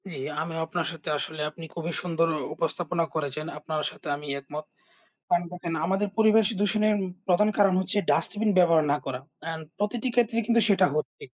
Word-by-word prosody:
জ্বী, 155 -6 -6 0.2
আমিও 165 0 -4
আপনার 170 0 -2
সাথে 160 -2 -7
আসলে 155 +1 -4
আপনি 165 +2 -10
খুবই 170 0 -3
সুন্দর 165 -2 +1 0.3
উপস্থাপনা 170 +1 0
করেছেন। 155 -1 -2
আপনার 155 0 -3
সাথে - - -11
আমি 145 +1 -8
একমত। 150 +2 -7 0.6
কারণ 175 0 +3
দেখেন 175 -2 -5
আমাদের 195 +3 +1
পরিবেশ 220 -1 +5
দূষণের 215 +1 +2 0.3
প্রধান 195 +4 +4
কারণ 200 -2 +5
হচ্ছে 190 +2 -1
ডাস্টবিন 215 0 +2
ব্যবহার 170 -3 +5
না 145 - +3
করা। 130 -2 -3 0.2
অ্যান্ড 160 0 -4
প্রতিটি 215 +4 -1
ক্ষেত্রেই 230 -1 +2
কিন্তু 235 -1 +4
সেটা 190 -2 +5
হচ্ছে। 155 - -3
175 Hz, 170 wpm, -26 LUFS, 160-205 Hz, 0.6 s, পরিবেশ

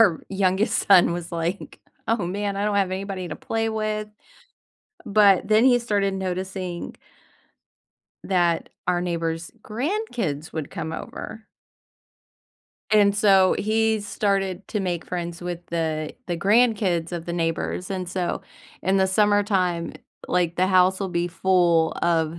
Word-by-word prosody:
our 185 -8 +4
youngest 195 +1 +1
son 180 -3 +6
was 175 -1 -6
like, 170 +3 -4 0.3
"Oh, 225 -5 +1
man, 200 +2 -2
I 200 - -1
don't 210 -1 0
have 195 -2 +2
anybody 190 -1 -4
to 155 - -6
play 225 0 -2
with." 215 -1 -2 1.0
But 200 -3 +4
then 215 +2 +5
he 250 -2 +5
started 205 -4 0
noticing 185 -1 -4 1.3
that 175 -3 +1 0.2
our 180 -1 +1
neighbors' 165 -2 -3
grandkids 230 - -3
would 155 -3 -5
come 160 - -5
over. 220 +6 -8 1.4
And 205 -2 +4
so, 195 -3 +5
he 220 +1 +1
started 195 -2 -1
to 210 - -2
make 175 -3 -2
friends 175 -1 -5
with 175 -1 -4
the 160 -2 -2
the 175 -2 -2
grandkids 200 -4 +2
of 170 -1 -4
the 170 - -3
neighbors 170 +2 -2
and 185 -2 -3
so, 180 -1 -2 0.4
in 190 +1 +2
the 190 -1 +3
summertime, 190 -4 +1 0.3
like, 175 -2 +1
the 185 - +3
house 185 0 +4
will 195 - -1
be 175 -1 -1
full 175 -2 +2
of 165 -1 +1
185 Hz, 140 wpm, -24 LUFS, 175-205 Hz, 1.4 s, son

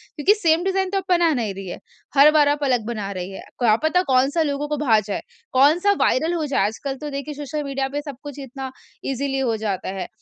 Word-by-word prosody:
क्योंकि, 340 +8 +4
same 340 -5 +2
design 385 0 0
तो 395 - -1
आप 385 - -1
बना 345 -3 +4
नहीं 225 -7 -1
रही 195 0 -8
है। 175 - -6 0.4
हर 285 +2 +8
बार 300 -2 +4
आप 290 0 0
अलग 250 -5 +1
बना 215 -4 -4
रही 185 -1 -5
हैं। 195 - -8 0.2
क्या 230 -4 +4
पता 315 +3 +3
कौन-सा 270 +6 +3
लोगों 290 -1 -2
को 300 0 -2
भा 220 -4 +5
जाए, 205 -1 -4 0.3
कौन-सा 310 +9 +5
वायरल 320 +6 +2
हो 325 -3 -1
जाए। 275 -8 +1
आजकल 270 +6 -3
तो 295 +3 -6
देखिए 280 +1 -5
सोशल 295 +1 -4
मीडिया 275 -1 -2
पे 290 +2 -3
सब 285 -2 -7
कुछ 285 - -10
इतना 265 0 -7 0.3
इज़ली 270 0 -2
हो 245 -4 +1
जाता 205 -4 -3
है। 190 -2 -4
280 Hz, 235 wpm, -22 LUFS, 235-305 Hz, 0.4 s, हर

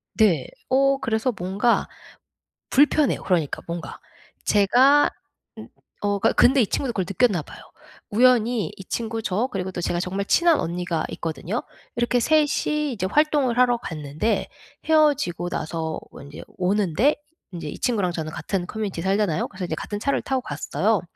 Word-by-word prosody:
네. 185 - +3 0.2
어 275 +1 +3
그래서 225 +3 0
뭔가 195 +7 +1 0.8
불편해요, 290 +1 +3
그러니까 170 -6 0
뭔가. 170 0 -6 0.5
제가 250 +8 +5 0.5
음. - - -9 0.3
어 205 -1 0
그러니까 - - +2
근데 265 +2 +5
이 215 - +2
친구도 250 -4 -2
그걸 190 -3 -1
느꼈나 195 -3 +2
봐요. - - -13 0.5
우연히 235 -4 +3
이 190 - -9
친구, 225 -1 -3
저, 205 +7 0
그리고 190 -1 -3
또 175 - -5
제가 175 0 -1
정말 195 +2 -3
친한 340 +5 +4
언니가 170 -1 -2
있거든요. 165 - -4 0.3
이렇게 240 +1 +1
3 310 +3 +3 0.2
이 300 -2 0
이제 190 -4 -2
활동을 290 -4 +2
하러 245 -1 +4
갔는데 155 - -2 0.4
헤어지고 290 - +2
나서 160 -1 -3 0.2
인제 140 +1 -10 0.2
오는데 200 - +2 0.4
인제 165 -4 -6
이 - - -8
친구랑 205 -7 0
저는 155 -2 -4
같은 190 -3 -3
커뮤니티에 205 -6 -4
살잖아요. 195 -4 +1
그래서 185 -2 -6
이제 160 - -3
같은 205 +5 -5
차를 280 +5 0
타고 265 -1 -1
갔어요. - - -1
205 Hz, 340 characters per minute, -23 LUFS, 175-250 Hz, 0.8 s, 제가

